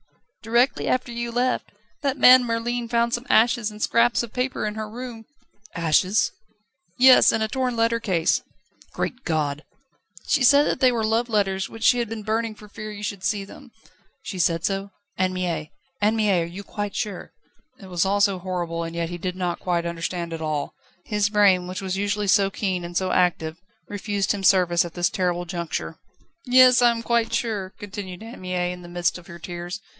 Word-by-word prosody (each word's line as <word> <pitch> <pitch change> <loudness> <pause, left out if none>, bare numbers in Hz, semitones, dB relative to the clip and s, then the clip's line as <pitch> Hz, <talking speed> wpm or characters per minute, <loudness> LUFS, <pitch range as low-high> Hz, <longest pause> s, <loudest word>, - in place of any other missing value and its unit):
"Directly 235 +3 +1
after 255 -1 0
you 235 0 -4
left. 250 +2 -1 0.3
That 280 -1 -1
man 255 -1 +8
Merlin 235 0 -2
found 235 0 +1
some 240 +3 -3
ashes 230 0 +3
and 210 0 -11
scraps 235 +2 +2
of 235 - -9
paper 255 -2 -2
in 210 - -2
her 215 0 -5
room 235 -1 -8 0.3
..." 210 +1 -26
"Ashes?" 170 +5 +2 0.7
"Yes; 255 0 +7
and 220 - 0
a - - 0
torn 255 +1 -1
letter 230 0 +1
case." 180 -7 +1 0.5
"Great 250 - -4
God!" 150 -2 -1 0.6
"She 285 - +2
said 285 +3 +6
that - - -1
they 255 -1 +5
were 230 -2 -1
love 225 +2 +1
letters, 195 -3 0
which 225 0 -9
she 245 - +5
had 235 -2 -2
been 225 -1 -6
burning 220 +1 -1
for 210 - -14
fear 215 +1 -8
you 205 0 -8
should 200 -2 -4
see 195 +1 -1
them." 265 +6 -14 0.5
"She 190 - -6
said 165 -1 +1
so? 195 0 -2 0.3
Anne 185 0 +1
Mie, 170 -4 -3 0.3
Anne 210 +2 +3
Mie, 205 -5 +2
are - - -1
you 180 +4 -8
quite 205 -1 -5
sure?" 205 -4 -4 0.5
It 195 - -12
was 180 -3 0
all 200 +1 +1
so 200 -2 +2
horrible, 175 -2 -3
and 165 0 -5
he 170 +1 -3
did 180 +1 -3
not 180 -2 -2
quite 175 -2 -1
understand 170 0 -4
it 165 - -5
all; 155 -2 -2 0.3
his 210 -1 0
brain, 200 -4 +4
which 185 +1 -5
was 190 0 -2
usually 205 +1 -1
so 195 0 +4
keen 190 -2 -2
and 175 0 -4
so 185 -1 0
active, 170 -2 0 0.3
refused 205 -1 -2
him 200 -2 -3
service 180 -3 +4
at 170 -1 -8
this 175 0 +1
terrible 175 -1 -1
juncture. 170 -1 -4 0.5
"Yes; 255 0 +7
I 240 - +6
am 230 -1 -2
quite 230 -1 +1
sure," 215 -5 -2
continued 195 -1 -7
Anne 230 -1 -10
Mie, 180 -1 -2
in 180 0 -8
the 175 - -11
midst 175 0 -1
of 175 - -17
her 170 - -9
tears. 175 +2 -6
200 Hz, 200 wpm, -24 LUFS, 180-230 Hz, 0.7 s, man